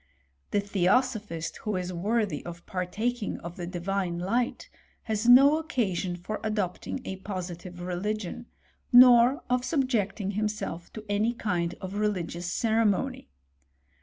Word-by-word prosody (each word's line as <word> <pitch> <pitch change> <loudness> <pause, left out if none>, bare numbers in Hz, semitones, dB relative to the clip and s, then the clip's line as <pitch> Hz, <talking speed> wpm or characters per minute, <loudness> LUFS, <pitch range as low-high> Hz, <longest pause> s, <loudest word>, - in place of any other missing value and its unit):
The 205 - +1
theosophist 200 -2 0
who 210 -2 -3
is 185 0 -3
worthy 200 -2 -1
of 170 0 -9
partaking 210 +5 -2
of 170 +1 -7
the 175 -2 -5
divine 180 0 -2
light, 230 +8 -1 0.4
has 220 +1 0
no 280 +5 +8
occasion 195 - -1
for 180 +5 -5
adopting 215 +3 -2
a 190 - -4
positive 180 -2 -6
religion, 200 +5 -3 0.4
nor 245 +1 +7
of 250 0 +1
subjecting 230 - 0
himself 210 -4 -3
to 215 -1 -8
any 210 +3 +1
kind 175 -6 -1
of 190 +2 -5
religious 180 -4 -2
cere 225 +1 +2
mony. 205 - 0
205 Hz, 130 wpm, -28 LUFS, 180-230 Hz, 0.4 s, no